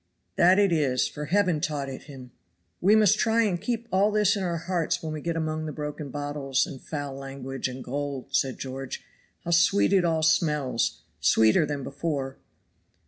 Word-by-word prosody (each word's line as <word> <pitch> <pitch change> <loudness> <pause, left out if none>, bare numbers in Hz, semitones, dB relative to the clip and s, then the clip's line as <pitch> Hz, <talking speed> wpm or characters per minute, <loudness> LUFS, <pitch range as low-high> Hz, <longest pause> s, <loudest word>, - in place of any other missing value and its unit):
"That 180 +2 +5
it 200 -2 +4
is, 140 -6 +2
for 150 - -6
Heaven 180 -2 +1
taught 145 -4 -2
it 135 -1 -8
him. 130 -4 -11 0.5
We 205 +4 +5
must 215 -1 +4
try 230 0 +3
and 180 -6 -1
keep 235 -1 -3
all 195 +2 +3
this 210 -1 +3
in 200 - -3
our 175 -2 -1
hearts 170 0 -1
when 155 -1 -3
we 155 - -5
get 170 +1 -2
among 155 -1 -2
the - - -4
broken 150 -1 -5
bottles, 145 -1 -1
and 135 - -9
foul 145 -3 -5
language, 135 -1 -5
and 130 0 -7
gold," 140 0 -5
says 130 -2 +1
George. 135 0 -6 0.4
"How 170 - -2
sweet 170 +4 +4
it 190 -2 +4
all 160 -2 +1
smells, 150 -6 +1 0.2
sweeter 110 +7 +4
than 145 -2 -3
before." 140 -2 -3
150 Hz, 185 wpm, -26 LUFS, 135-175 Hz, 0.5 s, That